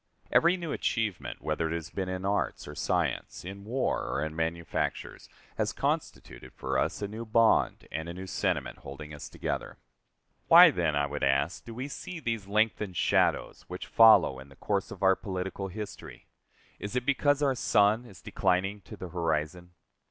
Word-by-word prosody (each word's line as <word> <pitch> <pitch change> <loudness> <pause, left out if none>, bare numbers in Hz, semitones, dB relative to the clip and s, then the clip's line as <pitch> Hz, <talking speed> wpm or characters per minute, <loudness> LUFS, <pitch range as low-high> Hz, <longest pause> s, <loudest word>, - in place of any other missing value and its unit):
Every 175 +2 +4
new 170 -4 -5
achievement, 110 -5 -2
whether 75 +1 -1
it 85 - -2
has 85 0 -6
been 95 -2 -3
in 95 +1 -4
arts 100 +1 -1
or - - -7
science, - - -2
in 100 +2 -8
war 125 +4 0
or 70 - -1
in 80 0 -6
manufactures, 80 0 -3 0.3
has - - 0
constituted - - -3
for 65 0 -1
us - - -1
a - - -1
new 110 +3 -6
bond 115 0 +2
and 80 +1 -4
a - - -5
new 95 +1 -6
sentiment 90 - -2
holding 75 +2 -9
us 75 - -8
together. - - -4 0.7
Why, - - +10
then, 85 -4 0
I 70 0 +2
would 70 +1 -5
ask, 70 +5 +1
do 115 - -8
we 130 +3 -4
see 170 +4 -7
these 115 -8 -3
lengthened 105 -3 0
shadows - - +1
which - - -6
follow 110 -12 +6
in 65 +1 -12
the 70 - -16
course - - -2
of - - -8
our 95 0 +6
political 95 0 -4
history? 105 +2 -8 0.5
Is 100 +4 -5
it 125 -1 0
because 145 +1 +2
our 135 -2 +3
sun 110 -2 +3
is 95 -9 -14
declining 95 +2 0
to - - -10
the 90 - -7
horizon? 85 +1 -2
95 Hz, 180 wpm, -29 LUFS, 80-110 Hz, 0.7 s, Why